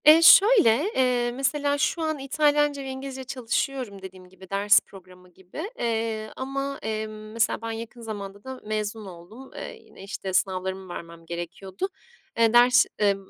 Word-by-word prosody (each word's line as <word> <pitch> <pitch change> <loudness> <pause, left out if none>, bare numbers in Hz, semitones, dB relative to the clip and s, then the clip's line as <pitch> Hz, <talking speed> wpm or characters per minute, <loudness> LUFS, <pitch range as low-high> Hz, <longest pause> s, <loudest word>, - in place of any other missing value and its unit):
Eee, 310 +2 +9
şöyle: 335 - +7
Eee, 245 -2 +2
mesela 285 +3 0
şu 330 +3 0
an 315 -2 -1
İtalyanca 290 +1 +2
ve 270 - -6
İngilizce 265 0 -6
çalışıyorum 250 -3 -3
dediğim 185 -1 -11
gibi 190 0 -16
ders 200 +1 +5
programı 180 -1 -16
gibi, 190 - -8
eee, 225 -2 -2
ama, 275 +1 -4
emm, 215 0 -5
mesela 230 +1 +1
ben 230 0 -4
yakın 230 +1 -7
zamanda 200 -3 -7
da 260 -1 -8
mezun 215 0 -3
oldum. 190 +8 -12
Eee, - - -6
yine, - - -15
işte, 195 -1 -5
sınavlarımı 190 0 -1
vermem 170 0 -9
gerekiyordu. 175 - -5 0.5
Eee, 230 -1 +4
ders, 245 +1 +6
eee, 205 -1 +3
225 Hz, 155 wpm, -25 LUFS, 195-270 Hz, 0.5 s, Eee